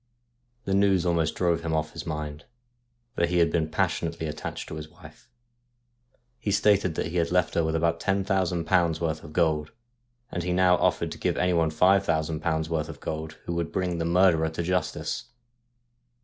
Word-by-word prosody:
The 95 - -1
news 95 -2 +3
almost 85 -3 +1
drove 85 -2 +1
him 80 -1 -1
off 80 0 -1
his - - -7
mind, 75 0 -5 0.7
for 85 - +1
he 90 +1 0
had 85 -1 +4
been 80 -2 0
passionately 80 +1 -1
attached 75 -1 -5
to - - -7
his 75 0 -7
wife. - - -16 1.1
He 105 - -3
stated 100 -3 +3
that - - -2
he 90 - -3
had 85 -1 +1
left 90 -1 +2
her 85 - +2
with 80 0 -1
about 85 0 +1
ten 95 +1 0
thousand 90 -3 0
pounds' 85 -2 +2
worth 80 -2 -2
of 75 - -10
gold; 80 -2 +1 0.6
and 90 - -2
he 90 +1 -1
now 90 0 +5
offered - - +1
to - - -8
give - - 0
anyone 85 -3 +2
five 95 +5 +3
thou 80 0 +2
sand 80 0 -4
pounds' 80 -1 0
worth 80 -1 -2
of 80 - -9
gold 80 0 -5
who 85 - -3
would 85 -1 -2
bring 90 -2 -1
the - - 0
murderer 85 -2 +4
to 80 +2 -4
justice. 90 -1 -2
85 Hz, 195 wpm, -26 LUFS, 80-90 Hz, 1.1 s, now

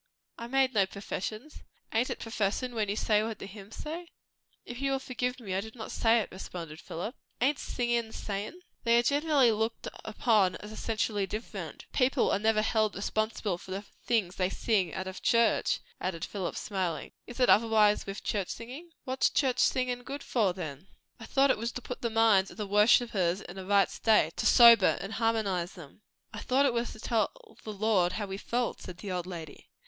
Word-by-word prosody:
"I 235 - -5
made 265 +1 +2
no 200 -3 +3
professions." 215 +7 -6 0.3
"Ain't 230 +3 +2
it - - -3
professin', 225 +3 -2
when 215 -3 -1
you 205 - 0
say 210 -1 +2
what 220 0 -3
the - - -8
hymns 200 +1 -11
say?" 335 +3 -6 0.6
"If 240 +2 -7
you 275 0 +1
will - - +2
forgive 250 -1 -3
me 200 -6 -5
I 190 - 0
did 220 +2 -10
not 220 -2 -7
say 225 0 +3
it," - - -7
responded 170 -4 -7
Philip. 180 +9 -5 0.3
"Ain't 275 +3 +2
singin' 240 -2 -1
sayin'?" 210 - -5 0.2
"They 235 0 +4
are 240 - +4
generally 285 -2 +3
looked 220 +1 -2 0.2
upon 215 -4 +2
as 210 +2 -9
essentially 215 -2 -1
different. 215 +4 -6
People 260 0 +2
are - - +2
never 215 0 +2
held 215 -1 +1
responsible 210 -2 -1
for - - -14
the 195 +2 -4 0.2
things 205 -6 0
they 185 -1 +1
sing, 195 -4 0
out 190 - -3
of 190 0 -7
church," 230 -2 +3 0.2
added 175 -3 -3
Philip, 190 -4 -4
smiling. 185 -6 -3 0.2
"Is 240 +1 -9
it 250 - +4
otherwise 215 -2 +4
with 195 +1 -6
church 200 -4 -1
singing?" 260 +9 -8
"What's 260 -1 +1
church 260 -3 +1
singin' 250 -1 +1
good 275 +3 -7
for, 215 -6 +1
then?" 170 -2 -7 0.3
"I 225 - -8
thought 275 0 +4
it - - -1
was 230 +1 -2
to 250 - -5
put 250 - -6
the 235 - 0
minds 220 -4 +4
of - - -13
the 210 - -3
worshippers 205 -3 +3
in 190 0 -9
a 190 - -7
right 200 -1 +4
state; 210 -8 +2
to - - +1
sober 235 -5 +7
and 195 +3 -6
harmonize 210 -6 0
them." 170 +1 -13 0.3
"I - - -5
thought 270 +2 +2
it 265 - +2
was 235 0 -1
to - - -13
tell 220 -1 -2
the 215 - -5
Lord 200 -4 +2
how 210 - -2
we 195 -1 -5
felt," 240 +3 -2
said 180 - -9
the 200 0 -6
old 180 -1 -3
lady. 165 -5 -9
220 Hz, 200 wpm, -30 LUFS, 195-240 Hz, 0.6 s, sober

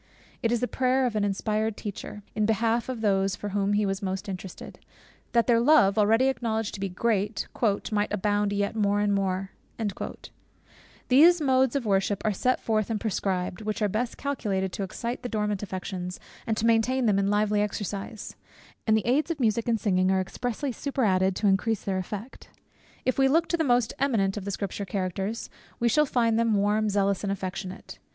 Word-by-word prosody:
It 230 - +1
is 240 - +1
the 250 - +1
prayer 260 +1 +1
of 240 -3 -1
an 210 - +1
inspired 215 +2 -1
teacher, 210 0 -7
in 215 -1 +1
behalf 230 +2 +1
of 250 -3 -4
those 195 -2 +2
for 205 - -5
whom 200 0 0
he 210 0 +2
was 195 +1 -2
most 190 0 -3
interested, 190 -1 -7 0.5
"that 235 -1 +4
their 235 -2 +4
love" 235 -6 +5
(already 220 +4 +4
acknowledged 225 -5 -1
to - - -6
be 195 0 -2
great) 205 +2 -1 0.4
"might 210 -1 0
abound 205 0 +1
yet 205 +1 -1
more 205 -1 +2
and 205 0 +2
more:" 195 -1 -1 1.6
Those 330 +7 +7
modes 265 -3 +2
of 275 -4 -1
worship 195 -1 +1
are 215 - +2
set 255 +6 +1
forth 215 -1 0
and 220 -2 -1
prescribed, 190 -3 -2
which 215 0 -3
are - - +4
best 225 +5 -2
calculated 200 -9 -2
to - - -4
excite 235 +5 -4
the 245 - -5
dormant 210 -3 -1
affections, 185 -2 -5 0.3
and 220 -1 0
to 225 - 0
maintain 230 +3 +3
them 205 -3 +3
in 195 - +1
lively 210 0 +2
exercise; 205 +1 -4 0.5
and 220 0 +5
the 215 - -2
aids 270 +8 +2
of 330 -3 -2
music 230 -1 +1
and 230 -2 +2
singing 185 -3 +2
are 190 0 +3
expressly 245 +8 -3
superadded 195 -9 +1
to 210 - -2
increase 205 +2 +2
their 190 -1 -1
effect. 210 +6 -7 0.6
If 255 +1 +1
we 270 - +5
look 325 +4 +3
to - - +2
the 325 - +1
most 245 -5 +2
eminent 220 -8 +1
of 205 -2 -5
the 200 - -2
Scripture 200 +1 -4
Characters, 195 +3 -3 0.3
we 235 - +2
shall 300 +5 +3
find 230 -3 +2
them 230 -2 +2
warm, 210 +2 +2
zealous, 200 -1 +1
and 200 - -1
affectionate. 185 -1 -6
210 Hz, 190 wpm, -27 LUFS, 195-235 Hz, 1.6 s, Those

